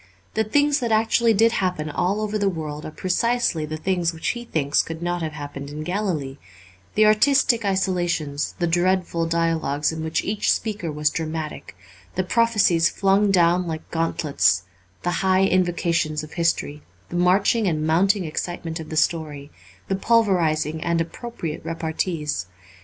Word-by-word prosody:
The 220 - +1
things 290 +6 +2
that 235 -3 -2
actually 225 +1 +3
did 225 +3 +4
happen 180 -7 -1
all 185 +7 -1
over 215 0 -2
the 200 -1 +2
world 155 -4 -5
are - - -7
precisely 185 -2 0
the 155 +1 -4
things 175 0 -1
which 160 - -2
he 240 0 -4
thinks 145 -9 +1
could 165 +1 -7
not 175 0 -1
have 160 -1 -3
happened 145 -2 -7
in 150 +1 -6
Galilee, 170 -8 -2 0.6
the 215 - +5
artistic 235 +2 +4
isolations, 175 -7 -1
the 175 - 0
dreadful 175 -1 +1
dialogues 165 -3 0
in 160 0 -5
which 160 0 -1
each 210 +1 0
speaker 210 -7 -2
was 150 0 0
dramatic, 155 - -5 0.4
the 185 - +1
prophecies 200 -6 +3
flung 200 +1 +2
down 175 -1 +3
like 160 -1 -6
gauntlets, 150 - +1 0.4
the 175 - 0
high 190 0 +3
invocations 170 -4 +1
of 155 - -10
history, 165 -3 -1 0.3
the - - -6
marching 195 +5 +3
and 155 -3 0
mounting 185 +4 +2
excitement 165 +1 -4
of 160 - -8
the 155 - -4
story, 150 -3 -1 0.4
the 195 - 0
pulverizing 175 -8 +1
and 170 -1 +1
appropriate 165 -1 -5
repartees. 160 - -3
170 Hz, 155 wpm, -23 LUFS, 155-195 Hz, 0.6 s, the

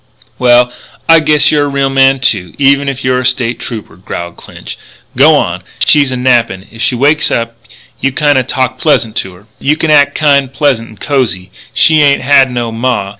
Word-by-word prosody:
Well, 125 0 +3 0.3
I 165 0 +6
guess 150 -1 +2
you're 145 -1 +1
a - - -2
real 140 -1 -1
man, 135 0 +3
too, 105 -8 -1
even 140 0 +2
if 135 0 -6
you're 130 0 0
a - - -3
State 120 -1 -1
Trooper," 110 -7 -8
growled 85 -1 -7
Clinch. - - -11 0.4
"G'wan - - +3
up. - - -22
She's 145 -3 +2
a 130 - -3
nappin'. 120 -7 0
If 115 - -11
she 125 - 0
wakes 145 +5 +1
up 115 0 -3 0.4
you 135 - -1
kinda 145 -1 +1
talk 130 0 -3
pleasant 115 -8 0
to 95 -1 -4
her. 95 +3 -19
You 150 +2 0
act 145 -2 +3
kind 140 -3 +1
pleasant 135 -5 -1
and 110 - -16
cosy. 115 -10 -2 0.2
She 155 -1 +3
ain't 140 -2 +2
had 135 -1 +4
no 120 -2 -3
ma. 115 -3 -2
130 Hz, 190 wpm, -11 LUFS, 115-140 Hz, 0.4 s, I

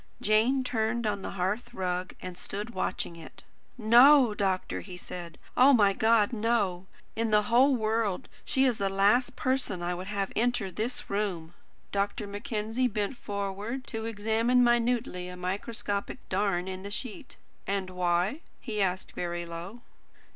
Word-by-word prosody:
Jane 225 +6 +3
turned 235 -1 -1
on 205 -2 -1
the - - -4
hearth 215 +7 -2
rug, 180 -1 -2
and 185 -1 -6
stood 205 +5 -5
watching 185 -4 -2
it. 165 -2 -12 0.3
"No, 245 +2 +7
doctor," 195 -3 -1
he 180 -3 -9
said. 175 -2 -8 0.2
"Oh, 265 +3 +7
my 205 -5 +5
God, 220 +1 +3
no! 210 -5 0 0.3
In 225 0 0
the 210 0 +4
whole 250 +5 +4
world, 220 -4 0 0.2
she 265 0 +2
is 245 -4 +1
the 195 -1 +1
last 210 +7 +3
person 255 -9 -1
I 175 +1 -1
would 180 +2 -6
have 200 -2 -2
enter 235 -4 0
this 225 +7 -3
room!" 185 -5 -2 0.4
Dr. 200 +1 -1
Mackenzie 215 +4 -2
bent 210 +2 -2
forward 205 +5 -4
to 225 -1 -4
examine 225 +3 +2
minutely 240 -6 +1
a 180 - -8
microscopic 200 +3 -3
darn 190 -2 0
in 190 0 -5
the 200 - -6
sheet. 245 +5 -6 0.3
"And 195 -1 -1
why?" 180 - +1 0.2
he 215 -4 -3
asked 185 -1 -1
very 175 0 -3
low. 170 +8 -8
210 Hz, 155 wpm, -29 LUFS, 185-235 Hz, 0.4 s, No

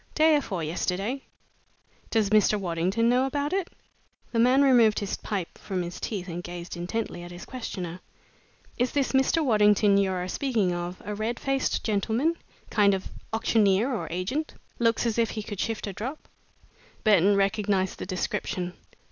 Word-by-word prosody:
"Day 315 0 +5
afore 195 - -1
yesterday." 190 - -2 0.9
"Does 215 -3 +1
Mr. 210 0 +4
Waddington 185 +5 0
know 250 +2 +3
about 285 +4 -2
it?" 385 -2 0 0.6
The 230 - 0
man 255 +4 +5
removed 235 -6 +5
his 200 -1 -2
pipe 195 -5 -5
from 185 -3 -3
his 175 +1 -6
teeth 195 -5 -4
and 175 0 -4
gazed 175 0 -7
intently 175 +1 -3
at 175 - -8
his 175 0 -9
questioner. 185 -9 -5 0.8
"Is 245 0 +1
this 280 -2 +1
Mr. 270 +4 +2
Waddington 210 -3 +4
you're 190 -2 0
a - - -4
speaking 215 -4 0
of 175 +1 -5
a 210 - -3
red 220 +3 -2
faced 270 -1 0
gentleman 225 - +1 0.4
kind 200 -2 +4
of 190 - -6 0.2
auctioneer 225 +1 +2
or 230 - -3
agent? 215 - -3 0.2
Looks 230 0 +2
as 230 -1 0
though 230 - +4
he 215 -1 -5
could 205 -2 -7
shift 225 -2 -2
a 200 - -5
drop?" 255 - -6 0.8
Burton 205 -2 +5
recognized 195 -1 +1
the - - -5
description. 180 0 -2
210 Hz, 165 wpm, -27 LUFS, 185-240 Hz, 0.9 s, Day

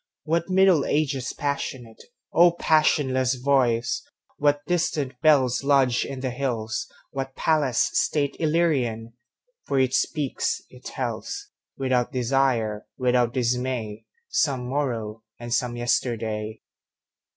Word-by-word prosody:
What 170 +2 -1
Middle 185 -5 +4
Ages 140 -4 0
passionate,O 145 - -1
passionless 135 -6 +2
voice! 125 -3 +1 0.4
What 145 0 +2
distant 160 -6 0
bellsLodged 135 -3 +3
in 135 -2 -6
the 130 -1 -2
hills, 120 -4 -2 0.2
what 135 -1 -5
palace 140 -4 +1
stateIllyrian! 145 -7 0 0.5
For 140 - 0
it 130 -1 +2
speaks, 145 -1 0
it - - -16
tells, - - -4 0.3
Without 130 -2 0
desire, 120 -4 0
without 125 -2 +2
dismay, 125 -3 -2 0.2
Some 130 - 0
morrow 115 -6 -2 0.2
and 120 0 -4
some 120 0 0
yesterday. 110 -3 -2
130 Hz, 100 wpm, -25 LUFS, 120-145 Hz, 0.5 s, Middle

